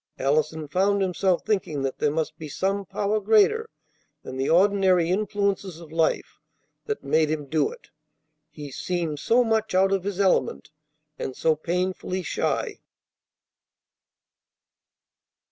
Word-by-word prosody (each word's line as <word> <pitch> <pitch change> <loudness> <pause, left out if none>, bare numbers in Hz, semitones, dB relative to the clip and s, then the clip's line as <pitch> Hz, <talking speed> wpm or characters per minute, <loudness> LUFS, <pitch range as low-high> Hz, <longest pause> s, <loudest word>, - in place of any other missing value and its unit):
Allison 155 +3 0
found 195 +5 +2
himself 185 -1 0
thinking 180 -10 -1
that 135 -1 -3
there 150 - +2
must 155 +1 -3
be 155 -2 -7
some 195 +5 -1
power 210 +1 0
greater 220 - +3 0.5
than 130 - -7
the 135 +1 -1
ordinary 185 -1 +4
influences 200 -3 -1
of 165 -3 -12
life 160 0 0 0.5
that 435 -1 -3
made 155 -1 +2
him 155 -2 -2
do 155 - +1
it. 485 0 -15 0.6
He 145 -2 -9
seemed 165 0 -3
so 240 +10 +3
much 220 -3 0
out 190 +1 +4
of 195 -2 +1
his 200 -1 -4
element, 190 -5 +1 0.5
and 130 - -4
so 160 -1 +2
painfully 180 +3 -2
shy. 150 - -2
185 Hz, 130 wpm, -25 LUFS, 155-200 Hz, 0.6 s, ordinary